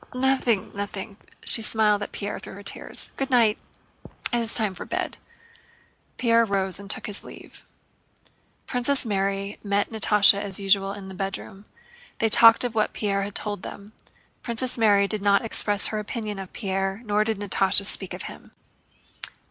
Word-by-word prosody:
"Nothing, 255 -5 0
nothing." 200 0 -6 0.3
She 225 - +6
smiled 215 -1 +2
at 205 - -6
Pierre 205 - -5
through - - -10
her 200 - -11
tears. - - -4
"Good 270 0 -3
night! 230 -4 +3 0.7
It 240 - +2
is 230 -1 -1
time 215 -4 +5
for 185 - -8
bed." - - -4 1.0
Pierre 230 -2 +3
rose 195 -3 -2
and 200 -1 -11
took - - -3
his 205 -1 -4
leave. - - -14 1.0
Princess 255 +2 +1
Mary 195 -1 -2
and 200 - -8
Natásha 205 0 +4
met 200 +1 -5
as 195 -1 -2
usual 195 0 +1
in 200 -1 -10
the 190 - -9
bedroom. 195 +1 -6 0.5
They 225 - 0
talked 230 +2 +7
of 245 -2 -3
what 215 -1 0
Pierre 200 -2 -1
had 200 +1 -6
told 205 -3 -3
them. 205 +3 -10 0.5
Princess 245 +1 +3
Mary 205 -3 +3
did 215 0 -2
not 200 +2 +2
express 205 -2 +4
her 215 - -3
opinion 210 -1 -6
of 190 -1 -9
Pierre 195 +1 -3
nor 210 0 +1
did 220 -1 -2
Natásha 200 0 +2
speak - - +1
of - - -7
him. - - -11
205 Hz, 170 wpm, -24 LUFS, 195-225 Hz, 1.0 s, talked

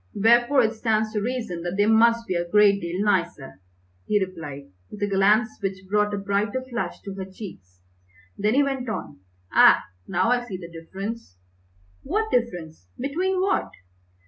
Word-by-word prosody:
"Wherefore 240 +5 +4
it 220 0 +1
stands 220 -1 0
to 210 - -1
reason 225 -7 -3
that 175 +2 -4
they 205 - +4
must 230 +1 +4
be 185 - -2
a 175 0 -2
great 205 0 +5
deal 175 +3 -2
nicer!" 170 - -1 0.5
he 210 - +3
replied, 160 - -6 0.2
with 210 - -10
a - - +2
glance 205 +3 +2
which 195 -1 -4
brought 210 +1 +1
a - - -4
brighter 200 +5 -1
flush 240 -2 -4
to 195 - -6
her 190 -1 -6
cheeks. 95 - -11 0.5
Then 210 +4 +1
he 285 - +5
went 265 -3 -2
on, 215 - -5 0.3
"Ah, - - +7 0.2
now 190 +5 +1
I 245 0 +2
see 210 -6 -6
the 170 -2 -10
difference." 190 - -7 0.6
"What 430 +8 -1
difference? 175 - -2
Between 365 +8 -1
what?" 390 +1 +1
205 Hz, 170 wpm, -24 LUFS, 185-235 Hz, 0.6 s, Ah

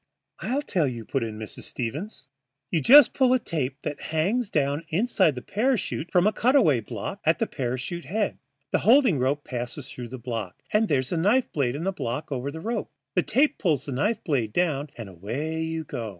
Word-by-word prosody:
"I'll 280 +4 -1
tell 175 - +1
you," 120 -3 -5
put 135 - -1
in 110 -1 -5
Mrs. 110 -1 -5
Stevens. 145 - -5 0.5
"You 165 - +1
just 275 - +8
pull 255 -2 +4
a - - +2
tape 140 - -3
that 150 - -4
hangs 195 +9 0
down 145 +1 0
inside 185 - +2
the 125 - -7
parachute 215 - -1
from 180 0 +4
a 215 - +3
cutaway 235 - +4
block 105 - -6
at - - +3
the - - +1
parachute 130 +7 -4
head. 210 +2 -1 0.3
The - - +2
holding 230 - +5
rope 140 +3 0
passes 125 +2 -5
through 125 -1 -7
that 125 0 -9
block, 115 -7 -5
and 215 +1 +3
there's 130 -5 +1
a 175 - 0
knife 210 +10 +2
blade 135 -4 0
in 155 - -4
the 195 - 0
block 145 -4 -4
over 135 0 -2
the 160 +3 -7
rope. 225 +1 -3 0.2
The 180 - +3
tape 275 - +2
pulls 150 - +1
the 140 - -5
knife 210 - 0
blade 125 - 0
down, 150 -5 0
and 115 -3 -6
away 125 - -4
you 160 0 -2
go. 120 -7 -5
155 Hz, 205 wpm, -26 LUFS, 130-205 Hz, 0.5 s, just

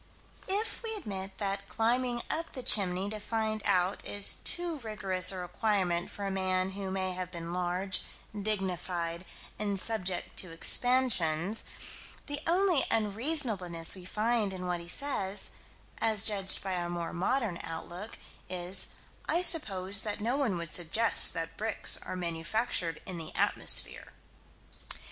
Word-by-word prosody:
If 415 +4 -1
we 450 -1 -3
admit 195 - -5
that 200 -1 -3
climbing 240 +2 0
up 330 +2 -3
the 255 - -6
chimney 190 -3 +3
to 215 - -4
find 220 0 -2
out 180 +2 +1
is 205 -1 +1
too 345 -3 0
rigorous 195 -5 +1
a 190 - -5
requirement 180 -1 0
for 200 - -6
a 195 - -2
man 185 0 0
who 195 0 -5
may 190 -1 -2
have 180 0 -4
been 170 -1 -6
large, 180 +1 +1 0.3
dignified 185 -4 -2 0.3
and 200 -2 -1
subject 190 -5 -2
to 185 - -2
expansions, 200 -2 +2 0.6
the 290 0 -2
only 355 -3 +3
unreasonableness 210 - 0
we 185 - -9
find 215 0 0
in 185 -1 -6
what 180 -1 -2
he 170 - -9
says 205 -5 -2 0.5
as 220 -2 +3
judged 200 -3 +2
by 190 -1 -2
our 175 0 -3
more 170 -1 -4
modern 195 +1 -1
outlook, 175 +6 -6 0.3
is: 180 +1 +1 0.4
"I 345 - +2
suppose 200 - +5
that 210 -1 -2
no 235 +5 0
one 255 -10 0
would 170 -2 -6
suggest 200 +6 +4
that 165 0 -4
bricks 220 +1 +2
are - - -6
manufactured 170 0 -1
in 180 -2 -4
the 160 - -7
atmosphere." - - +2
195 Hz, 145 wpm, -30 LUFS, 180-225 Hz, 0.6 s, suppose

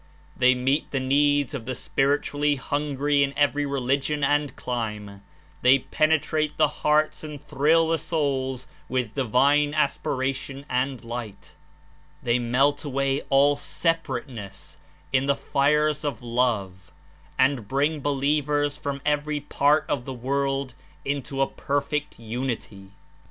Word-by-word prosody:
They 130 0 +4
meet 135 +4 0
the 135 - -1
needs 145 +1 +2
of 125 -4 -6
the 130 - -2
spiritually 145 +2 +1
hungry 145 +1 0
in 140 0 0
every 145 0 +2
religion 140 +2 0
and 145 0 +1
clime; 105 -5 -4 0.4
they 130 +2 +6
penetrate 155 +2 0
the 155 - +5
hearts 155 +1 +2
and 150 -2 -7
thrill 160 +5 +2
the 165 -1 +2
souls 135 -5 -1 0.2
w^ith 125 -4 -1
divine 140 +4 +2
aspiration 135 -1 -1
and 130 -1 -2
light; 115 -4 -7 0.7
they 120 0 +2
melt 135 +5 +2
away 135 -1 0
all 140 +1 +5
separateness 130 - -3 0.3
in 135 +1 +2
the 140 - +3
fires 150 +2 +1
of 140 -6 -3
love 105 -8 -1 0.5
and 130 -5 +2
bring 145 +5 +1
believers 145 +1 0
from 140 -1 -4
every 150 0 0
part 145 +1 +2
of 125 -4 -2
the 135 - -5
world 135 +1 -1 0.3
into 135 -1 -2
a - - 0
perfect 150 +1 -2
unity. 115 -4 -5
140 Hz, 125 wpm, -25 LUFS, 125-145 Hz, 0.7 s, they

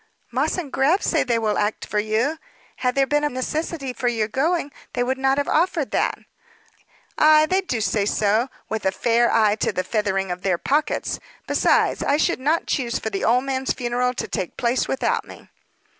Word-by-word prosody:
"Moss 265 +9 0
& 275 - -13
Grab 300 +10 +2
say - - +2
they 235 -2 +1
will 215 -2 0
act 210 +1 -1
for 210 - -1
you. 225 +9 0 0.4
Had 250 -1 0
there 275 0 +3
been 295 +2 +1
a 295 - +2
necessity 275 +1 -3
for 245 - -2
your 225 -3 0
going, 290 +5 0 0.2
they 245 - 0
would 260 +2 -1
not 270 0 +2
have 285 - 0
offered 325 -3 +1
that." - - 0 1.0
"Ay, 310 0 +6
they 375 +4 +1
do 255 -12 -3
say 205 0 0
so 215 +5 +1 0.2
with 220 0 -3
a 190 - +3
nice 235 +4 +2
eye 215 -2 +3
to - - 0
the 185 - -2
feathering 195 -1 -1
of 180 0 -5
their 185 -2 +1
pockets! 290 - -1 0.3
Besides, - - +2
I 285 - +2
should 340 0 +1
not 305 +5 +1
choose 245 -5 -1
for 220 - -4
the 195 - -3
old 245 +3 +3
man's 265 -1 -1
funeral 250 +1 -1
to - - -3
take 180 - -4
place 245 +1 +1
without 270 - 0
me." - - -14
250 Hz, 200 wpm, -22 LUFS, 220-285 Hz, 1.0 s, Ay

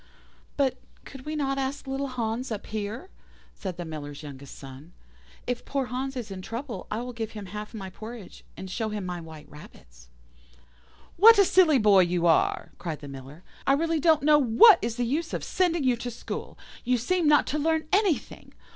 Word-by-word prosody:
"'But 275 -3 +1 0.3
could 270 +1 -11
we 310 - -3
not 275 -2 -1
ask 270 +2 -3
little 270 +1 -3
Hans 240 0 -3
up 215 - -4
here?' 220 - -5 0.4
said 185 -4 -6
the 175 - -5
Miller's 150 -2 -7
youngest 140 -2 -10
son. 135 +5 -12 0.5
'If 245 -1 -3
poor 275 -2 -2
Hans 265 +1 -3
is 235 -5 -5
in 190 -1 -6
trouble 235 +5 -6
I 215 +2 -2
will 250 0 -6
give 225 -1 -5
him 210 -2 -7
half 210 +3 -7
my 190 -3 -7
porridge, 220 0 -10
and 190 - -7
show 220 +4 -3
him 210 -3 -4
my 180 -1 -4
white 160 -2 -11
rabbits.' - - -16 1.1
"'What 450 +5 +9
a 400 - +6
silly 345 -6 +5
boy 210 -4 +5
you 175 -1 +2
are!' 165 - +2
cried 165 -4 -5
the 145 - -8
Miller; 135 +4 -10 0.2
'I 275 - +5
really 325 +2 +1
don't 315 -1 +3
know 300 0 +6
what 285 - +7
is 230 0 -2
the 245 0 -1
use 310 +7 -2
of - - -4
sending 345 -4 0
you 255 -2 +3
to 245 - -5
school. 235 - -7 0.3
You 250 +1 +2
seem 345 +7 0
not 295 0 +5
to 300 - -2
learn 320 +1 0
anything. 390 -6 0
235 Hz, 195 wpm, -27 LUFS, 185-285 Hz, 1.1 s, What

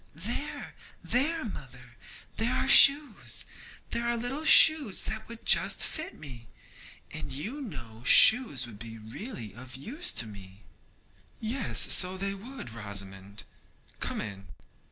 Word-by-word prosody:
'There, - - -6 0.3
there, 310 +5 -1
mother, 125 - -11 0.4
there 235 +3 -1
are - - -2
shoes; 280 -5 +5 0.5
there 235 - -2
are 235 0 0
little 250 +6 -2
shoes 310 -9 +6
that 220 0 -7
would 230 -1 -11
just - - +3
fit 315 +1 -4
me, 125 -6 -13 0.6
and 155 - -7
you 215 - -5
know 120 - -10
shoes 215 - +6
would 110 -4 -13
be 115 0 -10
really 110 - -9
of 130 +3 -12
use 260 - -1
to - - -2
me.' 100 -1 -14 0.8
'Yes, 235 +3 -2
so 185 0 0
they 195 +1 -3
would, 225 - -10
Rosamond. 100 -2 -7 0.6
Come - - -4
in.' 100 -2 -9
155 Hz, 135 wpm, -27 LUFS, -, 0.8 s, shoes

